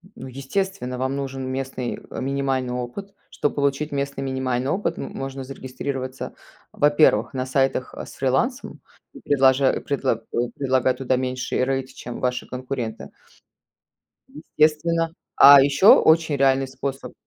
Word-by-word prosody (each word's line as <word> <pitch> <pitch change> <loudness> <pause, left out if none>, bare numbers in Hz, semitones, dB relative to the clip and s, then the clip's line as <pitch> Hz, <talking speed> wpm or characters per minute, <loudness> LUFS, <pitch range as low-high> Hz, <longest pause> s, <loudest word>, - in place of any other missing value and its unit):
Ну, 130 - -9
естественно, 135 +2 -3
вам 130 +2 -2
нужен 135 -1 -4
местный, 130 -1 -4
э, - - -6
минимальный 135 -2 -1
опыт. 125 +12 -6 0.2
Чтоб 145 - -1
получить 140 +1 0
местный 140 -1 -3
минимальный 130 -1 -2
опыт, 205 - -1
м - - -6
можно 135 0 -5
зарегистрироваться, 130 0 -6 0.4
во-первых, 145 -6 +3
на 130 -1 -2
сайтах, 135 0 0
э, - - -7
с - - -12
фрилансом, 135 - -1 0.4
предложа 135 -1 +3
предлага 130 -5 -1 0.3
предлагая 130 -2 +1
туда 130 0 -1
меньший 130 0 -2
рейт, 135 0 -2
чем 120 -2 -8
ваши 125 -1 -2
конкуренты. 125 -3 -5 1.5
Естественно. 165 +2 +2 0.2
А 140 0 +9
еще 140 +7 +3
очень 160 -2 +3
реальный 135 -1 +2
способ 135 +1 -6
135 Hz, 130 wpm, -23 LUFS, 130-140 Hz, 1.5 s, А